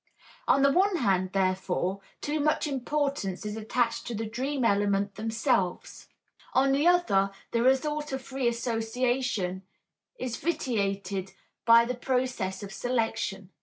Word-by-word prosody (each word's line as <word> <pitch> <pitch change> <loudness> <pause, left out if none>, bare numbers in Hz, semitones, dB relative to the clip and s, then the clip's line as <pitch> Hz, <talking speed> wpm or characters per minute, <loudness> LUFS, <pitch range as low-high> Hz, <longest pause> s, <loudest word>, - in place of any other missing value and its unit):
On 275 - +4
the 280 - +5
one 385 +4 +3
hand, 190 - +1
therefore, 190 0 0 0.2
too 300 +1 -1
much 305 +2 +1
importance 275 -8 -2
is 210 0 -3
attached 230 +2 -1
to 240 - -3
the 225 +2 -3
dream 255 +4 -2
elements 200 -1 +2
themselves; 220 -3 -1 0.5
on 270 +1 +4
the 285 +4 +3
other, 210 - +3 0.2
the 230 - +1
result 295 +4 +1
of 265 - -2
free 265 -1 -2
association 235 -4 -1 0.6
is 245 -3 -4
vitiated 200 - -2 0.3
by 230 0 +7
the 250 - -2
process 250 -6 -2
of 200 0 -7
selection. 225 -5 -2
235 Hz, 130 wpm, -28 LUFS, 200-270 Hz, 0.6 s, by